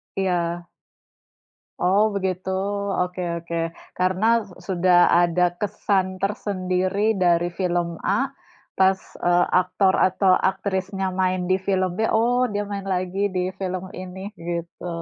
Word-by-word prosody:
Iya. 175 -2 -1 1.1
Oh, 195 +3 +3
begitu, 190 -1 -2 0.6
oke 180 0 -7 0.2
oke. 170 0 -4 0.4
Karena 195 +6 +3 0.3
sudah 180 -1 +4 0.2
ada 175 +1 +3
kesan 190 -2 0
tersendiri 195 0 0
dari 175 -2 +2
film 175 -2 -1
A, - - +1 0.5
pas 190 0 +4 0.2
eee, 175 0 +3 0.2
aktor 190 +1 +1
atau 190 +1 +2 0.2
aktrisnya 190 0 -3
main 185 0 0
di 185 - +4
film 185 -2 +1
B, - - -7
oh 245 +3 +3
dia 205 0 -1
main 200 -1 -4
lagi 185 +2 -1
di 180 - +1 0.2
film 185 -1 -3 0.2
ini, 185 +1 -8 0.2
gitu. 170 +1 -5
185 Hz, 120 wpm, -23 LUFS, 180-195 Hz, 1.1 s, sudah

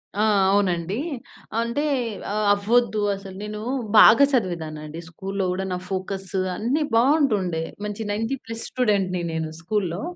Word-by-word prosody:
ఆ! 210 - +1 0.3
అవునండి. 185 -1 +1 0.6
అంటే 235 +5 -1 0.7
అవ్వొద్దు 215 +1 +2 0.2
అసలు 195 -1 -10
నేను 210 0 -5 0.4
బాగా 230 +6 +9
చదివేదాన్నండి. 160 - -2
స్కూల్‌లో 195 +3 -3
గూడా 190 +1 -2
నా - - -1
ఫోకస్ 190 0 -3 0.3
అన్ని 265 +8 0
బావుంటుండే. 225 - +2 0.2
మంచి 210 +1 -5
90 225 +6 -1
ప్లస్ 225 0 -5
స్టూడెంట్‌ని 200 -7 +1
నేను 160 -1 -2
స్కూల్‌లో. 180 -1 -2
200 Hz, 120 wpm, -23 LUFS, 180-225 Hz, 0.7 s, బాగా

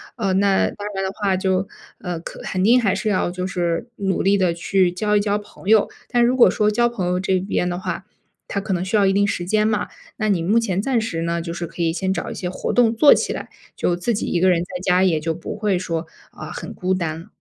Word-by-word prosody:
呃， 200 -6 -1
那 195 0 +3
当 205 0 -7
然 195 - -1
的 190 - -2
话 195 -3 0
就 190 0 0 0.3
呃， 175 -3 -4
肯 - - -9
肯 185 -1 -2
定 240 +5 +5
还 200 -5 +1
是 215 +3 -3
要 185 -3 +1
就 180 +1 -4
是 175 +2 -1
努 195 -2 -1
力 200 +1 +4
地 185 -2 +3
去 180 +1 +2
交 210 +4 0
一 - - +5
交 205 0 0
朋 205 -2 -12
友。 215 -2 +5 0.2
但 240 -1 +3
如 250 +2 +2
果 250 - +7
说 210 0 +1
交 240 +3 +2
朋 210 -6 -3
友 180 0 0
这 190 0 +1
边 180 -1 -1
的 175 - -3
话， 185 - -4 0.4
它 200 - -2
可 195 -1 -3
能 175 - -1
需 190 +4 -2
要 205 -2 +4
一 195 - +3
定 200 +1 +3
时 175 -3 -2
间 215 +3 +2
嘛， 215 -1 0 0.3
那 215 - 0
你 190 -4 +2
目 195 +7 +2
前 195 -5 -1
暂 245 +1 +1
时 185 -7 -3
呢 170 0 -1
就 170 -1 -5
是 170 0 -4
可 170 - -4
以 165 -1 +1
先 190 +2 -1
找 - - -3
一 - - -4
些 180 - -4
活 - - -3
动 235 -2 +3
做 285 +5 +7
起 - - -1
来， - - -6 0.3
就 175 - 0
自 215 +6 -1
己 205 - -2
一 175 - 0
个 185 +2 +4
人 175 - +3
在 180 0 -6
家 180 -1 +3
也 170 -5 +2
就 165 +2 -2
不 170 - -6
会 205 -3 0
说， 165 -2 -3 0.2
啊， - - -9
很 - - -7
孤 185 +1 -1
单。 165 -2 -4
190 Hz, 285 characters per minute, -21 LUFS, 180-210 Hz, 0.4 s, 果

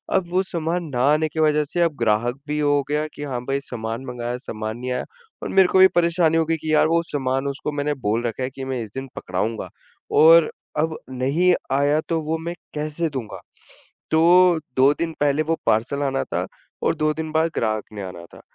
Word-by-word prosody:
अब 185 -2 +1
वो 185 +2 +1
सामान 170 0 -2
ना 120 - 0
आने 155 +1 +2
की 160 - -5
वजह 150 -1 +3
से 175 +4 -2
अब 165 -4 +2
ग्राहक 115 +3 +1
भी 150 - -2
ये 150 - 0
हो 145 -1 +3
गया 150 +1 0
कि 145 - -7
हाँ 125 -4 -3
भाई 135 0 0
सामान 115 0 -5
मँगाया, 120 -1 -4
सामान 110 -2 -5
नहीं 125 +1 -4
आया 125 - -2 0.4
और - - -3
मेरे 190 -1 +5
को 190 - +3
भी 190 - +9
परेशानी 170 -1 +3
हो 165 - +2
गई 165 0 0
कि 155 0 -3
यार 155 - +5
वो 165 +1 +2
सामान 135 -3 -2
उसको 140 +2 -3
मैंने 145 0 -1
बोल 115 +3 +1
रखा 125 +3 -4
है 130 - -1
कि 135 0 -8
मैं 130 -2 -3
इस 105 - -10
दिन 135 0 -5
पकड़ाऊँगा, 105 +5 -3 0.4
और 165 0 +7 0.3
अब 160 +1 0
नहीं 140 +8 +2 0.2
आया 145 +3 +3
तो 165 -1 0
वो 160 +2 -2
मैं 170 +2 -5 0.2
कैसे 155 +2 -2
दूँगा? 130 -7 -6 0.7
तो 175 +1 +5 0.2
2 135 +3 +6
दिन 165 -1 -3
पहले 145 +1 +2
वो 165 +1 0
पार्सल 120 +6 +1
आना 135 -1 0
था - - -3 0.4
और - - +2
2 155 0 +1
दिन 160 0 -5
बाद 160 +1 +1
ग्राहक 110 -2 0
ने 100 - -6
आना 90 -2 -8
था। - - -14
150 Hz, 220 wpm, -22 LUFS, 125-160 Hz, 0.7 s, भी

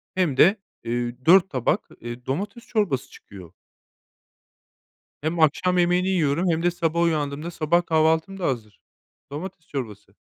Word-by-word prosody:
hem 175 -8 +1
de, 195 +4 +5 0.2
eee, 120 +1 -2
4 190 +2 +6
tabak, 130 -4 -1
eee, 120 +1 -8
domates 200 - -4
çorbası 200 - -1
çıkıyor. 95 -4 -13 1.7
Hem 160 +3 -2
akşam 180 +4 +3
yemeğini 180 +1 +2
yiyorum 170 -1 +1
hem 165 0 0
de 175 - +3
sabah 170 -1 -1
uyandığımda 155 -1 -1
sabah 170 +1 +1
kahvaltım 160 +4 +1
da 185 - -4
hazır. 110 -7 -4 0.5
Domates 170 +2 -7
çorbası. 110 -7 -7
160 Hz, 135 wpm, -24 LUFS, 135-180 Hz, 1.7 s, 4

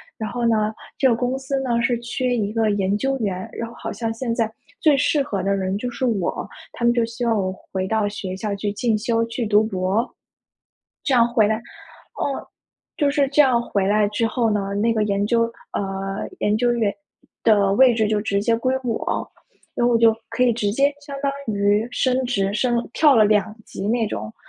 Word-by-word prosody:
然 220 -1 -4
后 240 +2 -2
呢， 215 -2 +2 0.3
这 265 - +4
个 235 - +3
公 245 +2 -1
司 270 +1 -2
呢， 240 -3 0
是 240 0 +1
缺 245 +1 -1
一 210 -1 -1
个 225 -1 +2
研 200 -1 +1
究 270 +5 0
员， 190 -6 -3
然 230 - -5
后 230 - -12
好 - - -6
像 225 +2 -3
现 230 0 -3
在 225 -1 0 0.3
最 305 -3 +4
适 280 +2 +2
合 200 -8 -3
的 195 +2 +1
人 190 0 -1
就 250 - -3
是 255 +2 -3
我， 205 -8 -1 0.3
他 235 - -2
们 240 - +5
就 240 -1 +2
希 235 +2 -4
望 230 -1 +2
我 190 -3 0 0.2
回 190 0 -2
到 220 0 +1
学 195 -2 -5
校 210 +1 -3
去 205 +1 -2
进 225 +2 0
修、 230 +1 0
去 230 0 -3
读 210 +1 +4
博。 195 +2 -1 0.9
这 - - -1
样 235 -1 +5
回 220 -4 +4
来 220 - +1 0.4
哦， 280 - -5 0.5
就 290 -2 +2
是 280 -1 +2
这 290 +2 +5
样 250 -3 +3
回 200 -4 -1
来 210 0 +3
之 210 +3 -1
后 225 0 +1
呢， 200 -1 -1
那 215 +3 +1
个 220 -2 +1
研 200 -1 0
究 230 +2 +2 0.3
呃 195 0 -3
研 210 +1 +1
究 240 +1 +2
员 225 -4 +1 0.5
的 205 -3 +4
位 255 +3 +6
置 220 -2 +1
就 210 0 +1
直 200 -1 0
接 230 +2 +2
归 255 +3 0
我， 230 -3 -2 0.4
然 240 - +1
后 245 - +3
我 - - +5
就 225 -1 +5
可 - - -3
以 250 - +4
直 210 -3 -1
接 275 +6 +3
相 285 -1 -8
当 280 -1 +1 0.2
于 205 +2 +2
升 255 0 +1
职 200 -5 0
升 240 +1 0
跳 295 0 +5
了 220 - +6
2 210 0 +1
级 195 - -5
那 230 0 +1
种。 110 - -5
225 Hz, 230 characters per minute, -22 LUFS, 205-245 Hz, 0.9 s, 位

